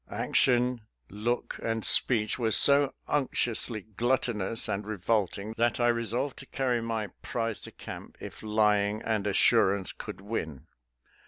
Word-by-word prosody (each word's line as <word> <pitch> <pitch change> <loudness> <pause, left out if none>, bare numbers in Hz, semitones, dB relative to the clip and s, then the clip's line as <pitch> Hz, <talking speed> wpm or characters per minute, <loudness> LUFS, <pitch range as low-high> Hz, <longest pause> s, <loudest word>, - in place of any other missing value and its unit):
" - - -33 0.2
Action, 125 -1 +2 0.3
look, 115 +5 -3
and 115 -1 -1
speech 110 -2 +3
were 115 -2 +1
so 140 +4 +5 0.2
unctiously 120 -5 0 0.2
glut 125 +2 +2
tonous 110 -1 -1
and 100 -1 -2
revolting 105 0 -1
that 120 +1 +1
I 120 0 +3
resolved 120 +4 -1
to 135 - -10
carry 125 -3 -1
my 110 -3 -3
prize 115 -2 -3
to - - -9
camp - - -10
if - - -9
lying 105 -1 +1
and 110 -3 -1
assurance 95 -1 +3
could - - -8
win. 80 - -5
115 Hz, 145 wpm, -28 LUFS, 105-120 Hz, 0.3 s, so